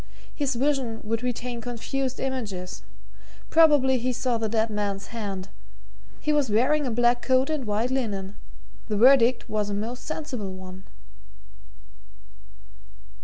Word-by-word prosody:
His 280 -3 -1
vision 260 -3 0
would 225 +1 -2
retain 245 -1 -3
confused 250 +2 -3
images. 205 -9 -4 0.7
Probably 290 -5 +5
he 255 +2 0
saw 245 -1 -1
the 220 -1 -1
dead 220 0 +1
man's 200 -1 -2
hand 200 -4 -4 0.7
he 300 - 0
was 290 -4 +2
wearing 260 +7 +2
a - - 0
black 240 +1 +2
coat 260 +3 +2
and 300 -5 -2
white 215 +4 0
linen. 205 -7 -2 0.5
The 210 - -1
verdict 250 +1 +5
was 210 -1 -1
a 200 - -2
most 235 +4 -4
sensible 265 - -4
one." 185 0 -10
240 Hz, 130 wpm, -26 LUFS, 210-265 Hz, 0.7 s, Probably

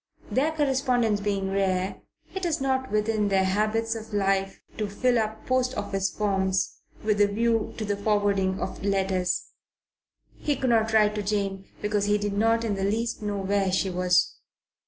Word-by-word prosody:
Their 290 +5 +2
correspondence 260 -7 +1
being 195 -2 -1
rare, 190 -1 0 0.3
it 380 - -5
is 335 -3 0
not 260 -1 0
within 215 0 +1
their 195 -1 +3
habits 215 +4 +1
of 220 -1 -7
life 195 -1 0 0.2
to 210 -1 -1
fill 245 +4 +2
up 220 0 -3
post 255 0 +1
office 195 -1 -1
forms 190 -2 0 0.2
with 210 -1 +2
a 205 - +6
view 225 +2 0
to 220 - -3
the 205 0 0
forwarding 200 -2 +1
of - - -5
letters. 190 -2 0 0.9
He 295 - 0
could 260 -1 0
not 225 -1 +3
write 210 -1 +4
to 210 - -2
Jane 200 -1 -2 0.2
because 210 -1 +1
he 205 0 +3
did 205 -1 -2
not 225 +3 +2
in 220 -3 0
the 195 -1 -2
least 225 +4 -1
know 205 -1 -2
where 195 0 +1
she 190 0 +1
was. 180 0 +2
210 Hz, 175 wpm, -26 LUFS, 195-225 Hz, 0.9 s, a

